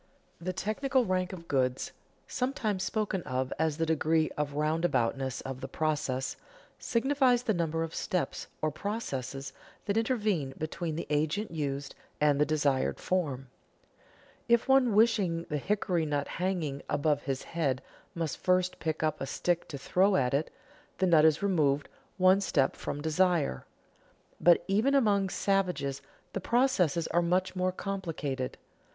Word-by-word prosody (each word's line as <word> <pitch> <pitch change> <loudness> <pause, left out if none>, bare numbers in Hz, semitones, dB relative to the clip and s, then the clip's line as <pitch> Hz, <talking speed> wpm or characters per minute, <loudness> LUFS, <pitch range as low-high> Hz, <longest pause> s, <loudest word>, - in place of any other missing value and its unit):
_ - - -11
The 185 - -1
technical 245 +8 0
rank 185 -2 0
of 170 -3 -9
goods 130 -2 0 0.4
(sometimes 245 -7 -1
spoken 200 -1 -1
of 130 -3 -2
as 160 -2 +1
the 165 - +1
degree 160 0 +2
of 145 -1 -2
roundaboutness 145 -4 0
of 135 -1 -6
the 135 - -4
process) 145 -3 -1 0.4
signifies 255 0 +2
the 220 - +1
number 165 -2 0
of 165 0 -5
steps 180 - -2 0.2
or 155 - +2
processes 140 - -4 0.3
that 205 +1 0
intervene 210 - 0
between 160 +1 -3
the 165 - -3
agent 155 +8 0
used 140 -3 -3 0.3
and 145 -1 +3
the 150 - +4
desired 145 -4 +1
form. 140 -8 -2 1.0
If 235 +2 +4
one 265 -5 +4
wishing 200 -7 +3
the 150 - 0
hickory 180 -2 0
nut 145 -1 -1
hanging 170 -6 -2
above 145 0 +1
his 135 -2 -3
head 140 -6 -1 0.3
must 165 -3 -3
first 185 0 +1
pick 160 -1 -2
up 155 -1 0
a 135 - -2
stick 175 +4 -1
to 145 - -6
throw 190 +8 +2
at 125 -6 +2
it, 145 +3 0 0.5
the 190 - +2
nut 160 -4 +5
is 160 +4 +3
removed 150 -7 +2 0.3
one 185 +1 +5
step 140 -8 +1
from 145 - -5
desire. 160 - +1 0.7
But 175 -1 +5
even 220 +8 +2
among 205 -7 +3
savages 180 -10 0 0.3
the 195 - -3
processes 190 - +2
are 175 - +2
much 185 +2 0
more 185 0 +1
complicated. 165 -10 -4
165 Hz, 150 wpm, -30 LUFS, 145-195 Hz, 1.0 s, nut